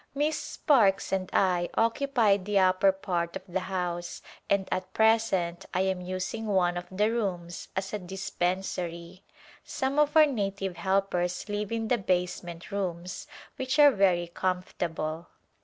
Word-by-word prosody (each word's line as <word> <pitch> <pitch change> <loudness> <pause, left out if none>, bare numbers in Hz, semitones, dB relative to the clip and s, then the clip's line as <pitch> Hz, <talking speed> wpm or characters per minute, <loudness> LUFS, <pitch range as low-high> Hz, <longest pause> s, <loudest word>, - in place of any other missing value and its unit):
Miss 300 +2 +1
Sparkes 215 - +2
and 190 -1 -1
I 180 -2 +2
occupy 230 -3 +3
the 200 +1 -1
upper 185 +1 +4
part 175 -3 -3
of - - -5
the 185 +1 -1
house 180 -2 -4 0.3
and 200 -1 +2
at 185 0 -2
present 220 -6 +2
I 185 - +3
am 190 -1 0
using 185 +5 -4
one 180 -3 +2
of 175 0 -5
the 210 +4 +1
rooms 180 -7 -3
as 190 +1 -3
a 210 - -1
dispensary. 180 -1 -3 0.4
Some 270 +2 -1
of 300 +1 +3
our 310 - +9
native 195 - -2
helpers 190 -2 0
live 205 0 -3
in 225 -1 -1
the 245 - +2
basement 180 -1 -2
rooms 180 -3 -4 0.3
which 260 +3 -1
are 290 -1 +8
very 185 -5 +3
comfortable. 170 -2 -3
190 Hz, 145 wpm, -28 LUFS, 180-210 Hz, 0.4 s, our